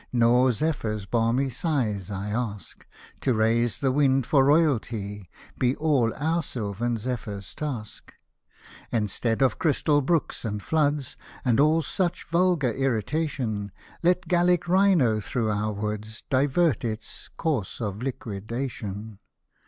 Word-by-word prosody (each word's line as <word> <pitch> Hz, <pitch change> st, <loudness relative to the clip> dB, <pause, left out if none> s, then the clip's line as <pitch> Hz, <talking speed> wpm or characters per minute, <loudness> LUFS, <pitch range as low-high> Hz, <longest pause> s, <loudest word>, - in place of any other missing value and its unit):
Nor 125 Hz, +1 st, +4 dB
zephyrs 110 Hz, -7 st, -2 dB
balmy 120 Hz, +5 st, +1 dB
sighs 115 Hz, -, -1 dB
I 100 Hz, +1 st, -4 dB
ask; 110 Hz, -3 st, -4 dB, 0.3 s
To 130 Hz, -, +2 dB
raise 115 Hz, +1 st, +2 dB
the 135 Hz, -2 st, +2 dB
wind 135 Hz, -2 st, +3 dB
for 135 Hz, +1 st, +4 dB
Royalty 115 Hz, -, +1 dB, 0.3 s
Be 125 Hz, +1 st, +2 dB
all 140 Hz, -8 st, +2 dB
our 160 Hz, +4 st, 0 dB
Sylvan 115 Hz, -, -2 dB
zephyr's 105 Hz, -4 st, -5 dB
task! 130 Hz, -8 st, -6 dB, 0.8 s
And, 105 Hz, -4 st, 0 dB
'stead 115 Hz, +4 st, 0 dB
of 130 Hz, -, +2 dB
crystal 150 Hz, -2 st, +2 dB
brooks 160 Hz, +3 st, 0 dB
and 105 Hz, -3 st, -2 dB
iioods, 145 Hz, +1 st, 0 dB, 0.3 s
And 125 Hz, -1 st, +3 dB
all 155 Hz, +3 st, +4 dB
such 175 Hz, +1 st, -1 dB
vulgar 170 Hz, -7 st, +2 dB
irrigation, 125 Hz, -4 st, -1 dB, 0.3 s
Let 180 Hz, +1 st, +2 dB
Gallic 175 Hz, 0 st, +3 dB
rhino 175 Hz, -, +4 dB
through 110 Hz, +1 st, -1 dB
our 105 Hz, +1 st, -1 dB
Woods 105 Hz, +2 st, -4 dB
Divert 140 Hz, +1 st, +2 dB
its 110 Hz, -1 st, -5 dB
" -, -, -32 dB
course 145 Hz, -, -1 dB
of 105 Hz, -2 st, -4 dB
liquid 110 Hz, -5 st, -5 dB
ation." 110 Hz, -5 st, -5 dB
125 Hz, 130 wpm, -26 LUFS, 110-150 Hz, 0.8 s, Nor